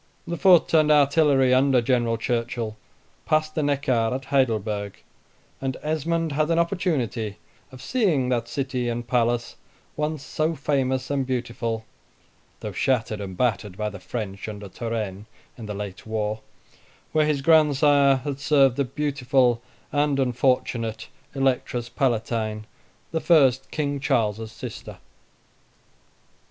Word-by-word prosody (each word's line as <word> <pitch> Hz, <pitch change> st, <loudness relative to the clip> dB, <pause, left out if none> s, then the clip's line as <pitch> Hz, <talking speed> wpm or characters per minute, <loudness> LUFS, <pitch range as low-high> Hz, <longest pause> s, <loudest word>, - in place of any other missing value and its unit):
The 170 Hz, -, -3 dB
foot 180 Hz, -2 st, +5 dB
and 155 Hz, -1 st, +5 dB
artillery 140 Hz, -3 st, +4 dB
under 130 Hz, 0 st, +4 dB
General 120 Hz, -1 st, +1 dB
Churchill 115 Hz, -1 st, -2 dB, 0.5 s
passed 155 Hz, 0 st, +1 dB
the 155 Hz, -, -1 dB
Neckar, 135 Hz, -5 st, +1 dB
at 135 Hz, 0 st, -5 dB
Heidelberg; 110 Hz, -7 st, 0 dB, 0.6 s
and 135 Hz, -1 st, -2 dB
Esmond 160 Hz, +1 st, -1 dB
had 155 Hz, +2 st, 0 dB
an 165 Hz, -, +2 dB
opportunity 150 Hz, -, -1 dB, 0.3 s
of 130 Hz, 0 st, -12 dB
seeing 165 Hz, -, +1 dB
that 120 Hz, -2 st, 0 dB
city 125 Hz, -1 st, -2 dB
and 120 Hz, 0 st, -4 dB
palace, 120 Hz, 0 st, 0 dB, 0.4 s
once 150 Hz, -1 st, -2 dB
so 155 Hz, +4 st, -1 dB
famous 130 Hz, -2 st, -1 dB
and 140 Hz, -1 st, +1 dB
beautiful 120 Hz, -3 st, -3 dB, 0.8 s
(though -, -, -4 dB
shattered 115 Hz, -5 st, 0 dB
and 95 Hz, -2 st, -7 dB
battered 105 Hz, -5 st, -1 dB
by 105 Hz, -1 st, -2 dB
the 105 Hz, -, -9 dB
French, 100 Hz, +1 st, -5 dB
under 105 Hz, -1 st, -7 dB
Turenne, 110 Hz, -2 st, -4 dB, 0.3 s
in 115 Hz, -3 st, -9 dB
the 105 Hz, -, -5 dB
late 100 Hz, 0 st, -7 dB
war), 110 Hz, -1 st, -2 dB, 0.7 s
where 155 Hz, -1 st, +2 dB
his 145 Hz, -3 st, 0 dB
grandsire 145 Hz, -3 st, +5 dB
had 140 Hz, -1 st, -4 dB
served 140 Hz, -3 st, +3 dB
the 140 Hz, -, +1 dB
beautiful 130 Hz, -3 st, +1 dB, 0.3 s
and 145 Hz, -1 st, +1 dB
unfortunate 125 Hz, -3 st, 0 dB, 0.3 s
Electress 125 Hz, -3 st, 0 dB
Palatine, 115 Hz, -4 st, -1 dB, 0.5 s
the 160 Hz, 0 st, -1 dB
first 135 Hz, -7 st, +4 dB
King 145 Hz, -2 st, -2 dB
Charles's 115 Hz, -5 st, 0 dB
sister. -, -, -8 dB
130 Hz, 130 wpm, -24 LUFS, 115-145 Hz, 0.8 s, foot